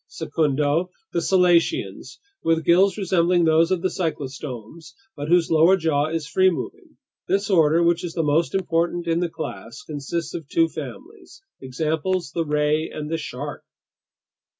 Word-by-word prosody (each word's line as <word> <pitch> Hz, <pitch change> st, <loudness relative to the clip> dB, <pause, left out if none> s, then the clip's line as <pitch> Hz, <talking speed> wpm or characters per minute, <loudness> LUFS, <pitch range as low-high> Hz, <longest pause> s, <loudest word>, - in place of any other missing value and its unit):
"Secundo, 150 Hz, +3 st, 0 dB, 0.2 s
the 170 Hz, -, +1 dB
selacians, 180 Hz, -, +1 dB, 0.3 s
with 165 Hz, -1 st, +1 dB
gills 190 Hz, +3 st, +4 dB
resembling 175 Hz, -3 st, +2 dB
those 160 Hz, +1 st, +4 dB
of 185 Hz, -2 st, -1 dB
the -, -, +3 dB
cyclostomes 145 Hz, -, -6 dB, 0.2 s
but 145 Hz, -, -5 dB
whose 170 Hz, 0 st, +3 dB
lower 165 Hz, +4 st, +5 dB
jaw 155 Hz, -4 st, +1 dB
is 160 Hz, -1 st, -3 dB
free 185 Hz, +4 st, +3 dB
moving. 350 Hz, -, -7 dB, 0.3 s
This 200 Hz, +1 st, 0 dB
order, 165 Hz, -1 st, +4 dB
which 170 Hz, 0 st, +2 dB
is 170 Hz, -2 st, -5 dB
the 165 Hz, -, 0 dB
most 155 Hz, +4 st, +1 dB
important 175 Hz, -1 st, 0 dB
in 165 Hz, 0 st, +1 dB
the 175 Hz, -1 st, -1 dB
class, 115 Hz, -, -7 dB
consists 155 Hz, +2 st, -4 dB
of 165 Hz, -5 st, -6 dB
two 165 Hz, 0 st, +3 dB
families. 325 Hz, -, -10 dB, 0.2 s
Examples: 155 Hz, +5 st, -2 dB
the 165 Hz, -, -1 dB
ray 150 Hz, +1 st, 0 dB
and 150 Hz, 0 st, -6 dB
the 165 Hz, -, 0 dB
shark." 150 Hz, -, -6 dB
165 Hz, 150 wpm, -23 LUFS, 150-175 Hz, 0.3 s, lower